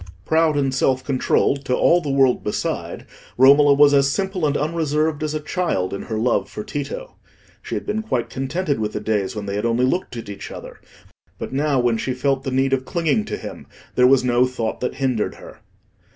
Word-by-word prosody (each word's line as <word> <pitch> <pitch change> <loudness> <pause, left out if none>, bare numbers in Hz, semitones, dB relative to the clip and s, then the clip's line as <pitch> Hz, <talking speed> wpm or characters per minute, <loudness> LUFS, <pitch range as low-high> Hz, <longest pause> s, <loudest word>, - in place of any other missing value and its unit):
Proud 160 0 +2
and 135 -2 0
self 130 0 +1
controlled 135 +1 +1
to 125 - +1
all 175 +6 +4
the 150 - -4
world 135 -2 +3
beside, 105 - -3 0.3
Romola 140 +2 +6
was 145 0 +6
as 140 -1 +4
simple 190 -2 -1
and 145 - 0
unreserved 155 -1 -1
as 155 0 -2
a - - -1
child 150 - -2
in 100 - -4
her 110 - -4
love 115 +3 0
for - - -6
Tito. - - -6 0.4
She - - -5
had - - -4
been 220 - -1
quite 130 - -2
contented 140 +2 -2
with 105 -1 -2
the - - -2
days 105 +1 -1
when 105 -1 -5
they 100 - -4
had 105 - -2
only 120 +2 +2
looked 130 -3 -2
at 115 - -7
each 100 -1 -8
other; - - -10 0.6
but - - -6
now, 140 -1 +1
when 120 -2 +1
she 130 +2 -2
felt 135 +1 0
the - - -3
need 135 +1 +1
of 130 -1 +1
clinging 170 - 0
to - - -4
him, - - -9 0.3
there 125 0 +5
was 135 -1 +4
no 125 0 +3
thought 115 -3 -3
that 125 - -3
hindered 130 -5 -1
her. - - -13
135 Hz, 210 wpm, -21 LUFS, 125-150 Hz, 0.6 s, Romola